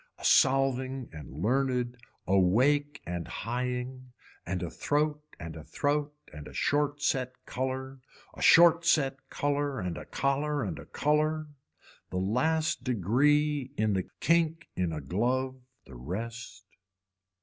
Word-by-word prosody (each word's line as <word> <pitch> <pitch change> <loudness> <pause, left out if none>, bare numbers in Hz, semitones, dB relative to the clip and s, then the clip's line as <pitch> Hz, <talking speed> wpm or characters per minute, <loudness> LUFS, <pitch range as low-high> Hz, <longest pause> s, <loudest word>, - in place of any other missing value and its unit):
A - - -8
solving 135 -1 +3
and 75 -4 -9
learned, 125 - 0 0.3
awake 130 +11 +2
and 85 -2 -4
highing 125 +2 -4 0.3
and 90 0 -2
a 85 - -4
throat 150 +1 0 0.2
and 85 -2 -7
a 80 - -8
throat 145 - -1 0.2
and 75 0 -9
a - - -11
short 145 0 0
set 130 -3 0
color, 130 +1 -4 0.3
a - - -11
short 170 0 +7
set 135 -5 +1
color 145 -1 -1
and 90 -3 -3
a - - -9
collar 145 +1 0
and 90 -7 -4
a - - -11
color. 155 +1 0 0.6
A 90 - -2
last 155 - +1
degree 135 - +2
in 110 -1 +2
the 95 -2 -2
kink 165 0 +1
in 90 -2 0
a 75 -1 -4
glove 130 - -1 0.2
the 65 - -14
rest. 105 - -6
130 Hz, 135 wpm, -29 LUFS, 105-145 Hz, 0.6 s, short